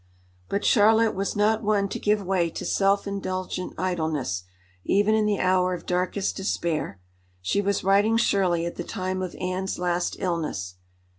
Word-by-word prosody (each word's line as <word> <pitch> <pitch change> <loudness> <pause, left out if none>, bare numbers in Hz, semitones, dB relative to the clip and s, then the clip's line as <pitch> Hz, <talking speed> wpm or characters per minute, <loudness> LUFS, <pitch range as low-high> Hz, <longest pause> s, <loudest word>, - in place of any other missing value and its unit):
But 200 - -1
Charlotte 220 +1 +5
was 195 +1 -2
not 215 +2 +2
one 205 -2 +1
to - - -4
give 210 -1 +1
way 180 -3 +1
to - - -6
self 195 0 +2
indulgent 185 -2 -4
idleness, 155 - -2 0.4
even 205 +2 +3
in 215 -1 +2
the 205 -1 +1
hour 185 0 +2
of 170 - -10
darkest 180 +2 -1
despair. 170 - -2 0.4
She 95 - 0
was 200 0 0
writing 200 +4 +4
Shirley 185 -7 +2
at 170 - -5
the 175 - -3
time 185 -1 -3
of 185 -2 -4
Anne's 185 +1 -2
last 175 0 -1
illness. 150 - -3
185 Hz, 160 wpm, -25 LUFS, 175-200 Hz, 0.4 s, Charlotte